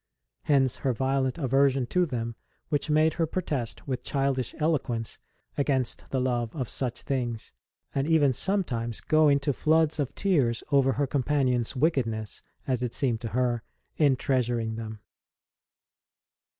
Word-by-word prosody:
Hence 135 -4 +3
her 130 - 0
violent 130 +2 0
aversion 135 -2 +2
to 180 -1 +2
them, 115 -4 -3 0.3
which 145 +1 -1
made 155 +1 +4
her 165 -1 0
protest 145 -10 -3
with 130 -2 -2
childish 135 -3 -1
eloquence 135 -8 -1 0.4
against 135 -3 0
the 130 - 0
love 120 -3 -1
of 130 -6 -2
such 125 -2 -4
things, 120 -5 -3 0.4
and 135 +1 0
even 150 -5 +4
sometimes 120 - -1
go 155 0 +4
into 140 0 +2
floods 160 +2 +2
of 140 -4 -2
tears 140 - +1
over 135 -2 +4
her 145 - +1
companions 130 -3 0
wickedness, 120 -7 0 0.2
as 130 -2 0
it 125 -2 -2
seemed 120 -5 0
to 115 - -3
her, 120 +1 0 0.3
in 145 -4 +4
treasuring 120 -4 0
them. 110 -1 -7
130 Hz, 140 wpm, -27 LUFS, 120-145 Hz, 0.4 s, made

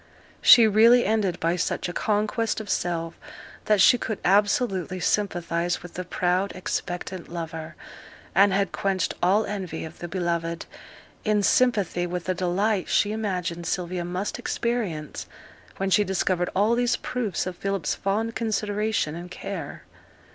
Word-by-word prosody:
She 235 - +9
really 230 +4 +6
ended 200 -4 0
by 165 +1 +1
such 180 - -1
a 175 - -5
conquest 215 +3 0
of 215 -3 -5
self 165 -1 -1 0.5
that 210 -1 +3
she 245 +5 +6
could 220 -2 -3
absolutely 195 -2 +2
sympathize 175 -3 -1
with 175 - -10
the 185 - -4
proud 180 +2 0
expectant 180 0 -4
lover, 165 -2 -6 0.6
and 195 +2 +5
had 195 0 +1
quenched 190 -3 -1
all 195 +5 +3
envy 185 -6 -4
of 160 - -11
the 175 - -5
beloved, 170 -2 -2 0.6
in 210 -1 +2
sympathy 200 -8 +2
with 175 0 -4
the 185 - -1
delight 185 +3 0
she 205 - +2
imagined 180 -6 -3
Sylvia 180 -1 -2
must 180 +4 -3
experience 205 -11 -3 0.5
when 195 0 -1
she 210 - +5
discovered 185 -2 0
all 210 +4 +3
these 240 0 +2
proofs 230 -8 -3
of 185 -1 -4
Philip's 195 -2 -2
fond 215 +4 -1
consideration 210 -6 -1
and 175 +2 -7
care. 180 -4 -6
190 Hz, 145 wpm, -25 LUFS, 175-210 Hz, 0.6 s, She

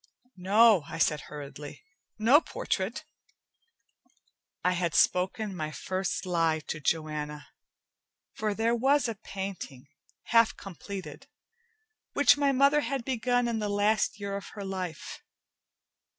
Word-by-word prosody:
"No," 205 +2 +5
I - - -6
said 150 -2 +2
hurriedly. 145 0 -9 0.3
"No 240 +8 +5
portrait." - - -3 1.6
I 180 - +3
had 175 -2 -1
spoken 190 +2 +2
my 155 -3 -3
first 185 +5 -3
lie 165 -3 +1
to 155 - -3
Joanna, 150 -1 -3 0.8
for 215 -1 -2
there 225 +2 +1
was 270 +3 +3
a 230 - -2
painting, 195 - -7 0.4
half 230 -1 +3
completed, 195 0 -8 0.9
which 285 - +6
my 285 -1 +2
mother 280 +2 +4
had 275 -4 -3
begun 245 -1 +1
in 230 -1 -1
the 210 -1 -2
last 205 +1 +1
year 200 -1 -4
of 200 - -6
her 200 -2 -6
life. 185 -4 -5
200 Hz, 120 wpm, -28 LUFS, 165-230 Hz, 1.6 s, which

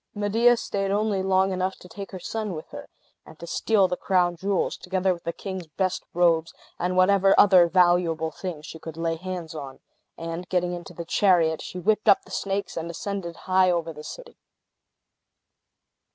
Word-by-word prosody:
Medea 225 +4 +3
staid 195 -3 -2
only 205 -1 0
long 190 0 +2
enough 185 +1 -1
to - - -15
take 200 +2 -8
her 190 - -7
son 215 0 -4
with 155 - -8
her, - - -9 0.3
and 160 - -15
to 170 - -9
steal 200 +3 +2
the 180 - -2
crown 180 -2 +1
jewels, 195 +2 -1
together 185 0 0
with 170 - -11
the 170 - -1
king's 190 -2 -7
best 185 +4 -2
robes, 165 -2 +2 0.2
and 180 +1 -1
whatever 195 +1 +5
other 185 -4 +7
valuable 175 -2 +2
things 155 -1 -6
she 160 - -9
could 160 0 -9
lay 165 0 -1
hands 175 -1 -6
on; 140 -4 -8 0.4
and 165 +2 -6
getting 180 -1 0
into 175 0 -8
the 170 - -6
chariot, 170 -4 +3
she 185 - -7
whipped 215 +4 +1
up 195 - +5
the - - -16
snakes, 195 0 -3
and 165 0 -4
ascended 175 0 -5
high 185 0 +4
over 170 -2 -1
the 150 0 -10
city. - - -10
180 Hz, 180 wpm, -25 LUFS, 170-195 Hz, 0.4 s, other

